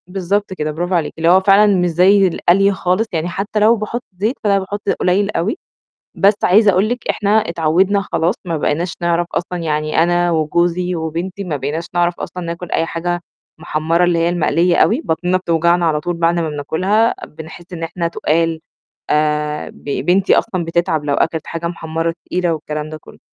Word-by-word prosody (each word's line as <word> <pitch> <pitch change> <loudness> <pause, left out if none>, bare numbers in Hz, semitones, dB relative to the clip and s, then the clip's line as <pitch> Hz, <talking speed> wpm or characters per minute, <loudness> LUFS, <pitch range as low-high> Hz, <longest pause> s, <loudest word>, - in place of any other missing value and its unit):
بالضبط 195 +2 -2
كده، 155 -4 -3
برافو 175 +4 -3
عليكِ، 165 -3 -1
اللي 165 +1 +2
هو 185 +2 +6
فعلًا 195 +2 +5
مش 180 0 +2
زي 190 +4 +4
القلي 190 +3 +3
خالص، 190 +3 0
يعني 165 0 -1
حتى 200 +4 -2
لو 220 +3 +5
باحط 230 +3 -4
زيت 215 +7 0
فأنا 200 -2 +3
باحط 200 +2 -5
قُليل 195 +3 +1
أوي، 210 - -1 0.6
بس 200 +1 +4
عايزة 210 +3 +5
أقول 190 +3 +2
لِك 245 +1 -4
إحنا 200 -1 0
اتعوّدنا 185 -1 +2
خلاص 175 +5 +1
ما 170 -3 -2
بقيناش 170 +4 -1
نعرف 170 0 +1
أصلًا 180 +1 -2
يعني 155 -1 0
أنا 175 +1 +2
وجوزي 170 +3 0
وبنتي 170 +5 -4
ما 165 -5 -3
بقيناش 145 +5 -3
نعرف 175 0 0
أصلًا 180 - -6
ناكُل 170 0 -6
أي 165 - +1
حاجة 175 +1 -3 0.4
محمّرة 160 +2 0
اللي 175 -1 +2
هي 165 +1 +2
المقليّة 170 0 +2
أوي، 235 +7 +3
بطنِنا 180 +3 0
بتوجعنا 170 -1 +1
على 155 -2 +1
طول 175 +3 -3
بعد 170 0 +2
ما 165 -2 -1
بناكُلها، 185 +10 +1
بنحس 160 +3 -11
إن 165 -2 -6
إحنا 170 +1 -2
تُقال، 165 0 0 0.5
آآ 150 0 0
ب - - -19 0.2
بنتي 190 +2 +4
أصلًا 185 -6 -2
بتتعب 165 -2 0
لو 145 -1 0
أكلت 160 +2 -1
حاجة 165 0 -4
محمّرة 165 -1 -3
تقيلة 180 -1 0
والكلام 150 -1 -4
ده 155 - -7
كلّه، - - -16
175 Hz, 185 wpm, -17 LUFS, 160-190 Hz, 0.6 s, هو